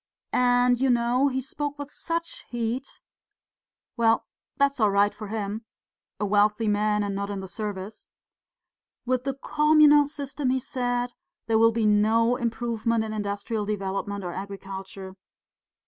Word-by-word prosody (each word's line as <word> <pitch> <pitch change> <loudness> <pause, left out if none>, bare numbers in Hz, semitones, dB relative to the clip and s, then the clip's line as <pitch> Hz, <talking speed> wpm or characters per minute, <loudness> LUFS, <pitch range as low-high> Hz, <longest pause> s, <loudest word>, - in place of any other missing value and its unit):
And, 245 0 +3
you 270 - +3
know, 245 +3 +3
he 265 -1 -1
spoke 290 +2 -4
with 285 0 -7
such 335 +1 -4
heat; 240 +2 -3 1.0
well, 230 -2 +3 0.3
that's 280 -1 +2
all 215 -2 +4
right 200 +1 +3
for 215 - -8
him 215 +1 -4 0.6
a 210 - 0
wealthy 210 +2 +2
man, 210 0 +2
and 200 -1 -2
not 200 +1 -3
in 200 -1 -3
the 190 - -6
service. 205 0 -6 1.0
'With 255 0 0
the 275 -1 -1
communal 300 0 +5
system,' 285 -2 -3
he 260 +1 +2
said, 245 -1 -2 0.3
'there 225 -1 +2
will 230 0 +6
be 225 -1 0
no 220 +3 +3
improvement 230 -1 -1
in 215 0 -4
industrial 205 +1 -2
development 200 -1 -3
or 175 -1 -4
agriculture. 195 -1 -7
225 Hz, 145 wpm, -26 LUFS, 205-255 Hz, 1.0 s, will